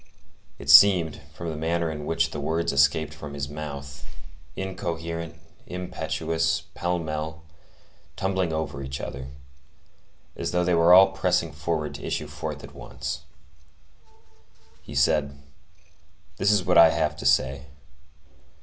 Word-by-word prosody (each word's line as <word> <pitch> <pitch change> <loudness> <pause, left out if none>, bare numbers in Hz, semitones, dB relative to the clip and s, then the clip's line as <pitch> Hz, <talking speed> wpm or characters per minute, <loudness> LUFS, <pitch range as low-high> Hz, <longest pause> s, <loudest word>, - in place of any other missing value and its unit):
It 70 0 0
seemed, 80 0 +7
from 85 +1 -6
the 80 - -4
manner 80 +1 -1
in 75 -1 -6
which 80 0 +1
the 75 - -5
words 80 +2 -1
escaped 70 +3 +2
from 75 -2 -9
his 70 -1 -4
mouth,—incoherent, 75 +4 -7 0.3
impetuous, 80 -2 -2
pell 90 +1 -1
mell, 80 -1 -5 0.7
tumbling 95 -3 -1
over 80 -3 -3
each 65 0 -5
other,—as 70 +3 -10
though 90 0 +1
they 90 0 +1
were 85 +1 +5
all 95 +1 +7
pressing 95 - 0
forward 80 -3 -3
to - - -9
issue - - -2
forth - - -6
at - - -11
once. - - -6 1.6
He 75 - -10
said:— 70 0 +2 1.0
"This 100 - +2
is 105 -3 +3
what 90 -1 +5
I 85 -1 +9
have 80 -2 0
to 70 - -7
say. 70 +1 +2
80 Hz, 130 wpm, -25 LUFS, 70-85 Hz, 1.6 s, I